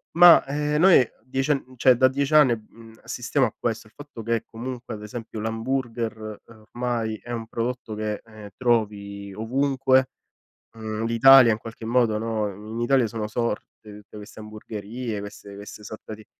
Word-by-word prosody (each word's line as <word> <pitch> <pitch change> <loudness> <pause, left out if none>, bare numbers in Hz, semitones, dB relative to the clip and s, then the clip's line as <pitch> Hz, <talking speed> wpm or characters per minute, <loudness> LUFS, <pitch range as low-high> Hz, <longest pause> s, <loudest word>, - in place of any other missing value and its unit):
ma, 175 0 +8
ehm, 150 +2 -1
noi 175 -6 +7 0.2
10 135 +3 -2
ann 145 - +3
n 130 - -15
cioè 125 +1 +5
da 130 +1 +6
10 140 +3 0
anni, 135 -6 +6
uhm, 115 +1 -11
assistiamo 125 +3 0
a - - -9
questo, 115 -2 -3
il 105 - -24
fatto 145 -5 -10
che 115 0 -1
comunque 120 +1 -7
ad 105 - -8
esempio 110 +1 -7
l'hamburger, 115 -2 -3
ehm, 115 -1 -16
ormai 120 -3 -2
è 120 - -11
un 115 -1 -4
prodotto 115 -1 -4
che, 105 -1 -3
ehm, 110 -2 -12
trovi 100 -4 -1
ovunque, 130 +3 +1 0.7
mhmm, 110 0 -4
l'Italia 115 +1 +7
in 110 - -2
qualche 115 0 -10
modo, 115 -2 +2
no, 110 -1 -2
in 105 +4 -7
Italia 125 0 +3
sono 110 -1 -4
sorte 115 -1 -2 0.3
tutte 105 +1 -15
queste 105 +1 -11
hamburgherie, 110 +1 -6
queste 100 0 -10
queste 100 +1 -10
sorta 110 +1 -8
di 110 0 -15
115 Hz, 170 wpm, -24 LUFS, 110-130 Hz, 0.7 s, ma